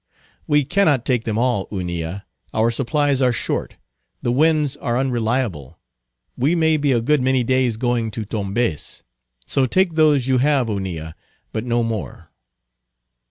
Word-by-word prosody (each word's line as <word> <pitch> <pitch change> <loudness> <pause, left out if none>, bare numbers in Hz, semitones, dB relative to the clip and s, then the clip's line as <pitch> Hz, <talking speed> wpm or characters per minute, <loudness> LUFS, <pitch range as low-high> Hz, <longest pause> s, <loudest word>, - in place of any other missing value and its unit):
"We 145 -2 +3
cannot 150 -6 +2
take 125 -3 0
them 110 -2 -1
all, 120 -5 +1
Hunilla; 90 0 -4 0.3
our 115 +2 +3
supplies 135 +3 0
are 125 -1 +4
short; 120 - -3 0.5
the 120 - +1
winds 150 +1 +2
are 120 0 -1
unreliable; 120 - -1 0.6
we 145 +7 +1
may 160 -2 +3
be 145 -2 +1
a 120 -3 +2
good 145 +4 +2
many 130 0 +2
days 130 -2 +1
going 120 -1 0
to 110 0 -5
Tombez. 100 -4 -2 0.4
So 135 -2 +1
take 185 +5 +2
those 150 -5 +3
you 130 -1 +2
have, 135 -3 +2
Hunilla; 90 -6 -4 0.4
but 110 +1 -3
no 120 -1 +1
more." 115 -3 -5
125 Hz, 150 wpm, -21 LUFS, 110-140 Hz, 0.6 s, are